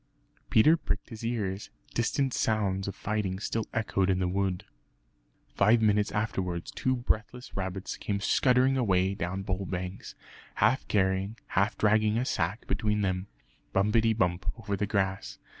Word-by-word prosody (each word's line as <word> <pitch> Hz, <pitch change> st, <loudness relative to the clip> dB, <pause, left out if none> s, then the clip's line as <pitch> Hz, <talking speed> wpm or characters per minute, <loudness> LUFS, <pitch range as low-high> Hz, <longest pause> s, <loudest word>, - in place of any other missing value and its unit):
Peter 150 Hz, +9 st, +6 dB
pricked 165 Hz, -, -3 dB
his 110 Hz, -1 st, -9 dB
ears; 105 Hz, -4 st, -2 dB, 0.2 s
distant 130 Hz, +2 st, 0 dB
sounds 100 Hz, -3 st, 0 dB
of 100 Hz, -, -4 dB
fighting 100 Hz, -3 st, -2 dB
still 110 Hz, +1 st, -2 dB
echoed 100 Hz, -4 st, 0 dB
in 95 Hz, -, +3 dB
the 90 Hz, -1 st, 0 dB
wood. 95 Hz, 0 st, -1 dB, 0.9 s
Five 110 Hz, +4 st, +4 dB
minutes 105 Hz, -1 st, +2 dB
afterwards 95 Hz, -5 st, -2 dB
two 130 Hz, 0 st, 0 dB
breathless 125 Hz, +1 st, -2 dB
rabbits 95 Hz, 0 st, -4 dB
came 100 Hz, -1 st, -2 dB
scuttering 125 Hz, +5 st, +3 dB
away 95 Hz, -5 st, +2 dB
down 95 Hz, +1 st, -3 dB
Bull 95 Hz, -1 st, -2 dB
Banks, 90 Hz, +1 st, -5 dB, 0.4 s
half 125 Hz, +6 st, +2 dB
carrying 95 Hz, +2 st, +1 dB
half 100 Hz, +2 st, +1 dB
dragging 110 Hz, +1 st, +3 dB
a 125 Hz, -, 0 dB
sack 100 Hz, -, -1 dB
between 105 Hz, -1 st, 0 dB
them, 95 Hz, -1 st, -1 dB, 0.5 s
bumpetty 110 Hz, +3 st, +3 dB
bump 90 Hz, -4 st, 0 dB
over 105 Hz, -3 st, -3 dB
the 100 Hz, +1 st, -1 dB
grass. 95 Hz, -2 st, -1 dB
100 Hz, 145 wpm, -29 LUFS, 95-110 Hz, 0.9 s, Peter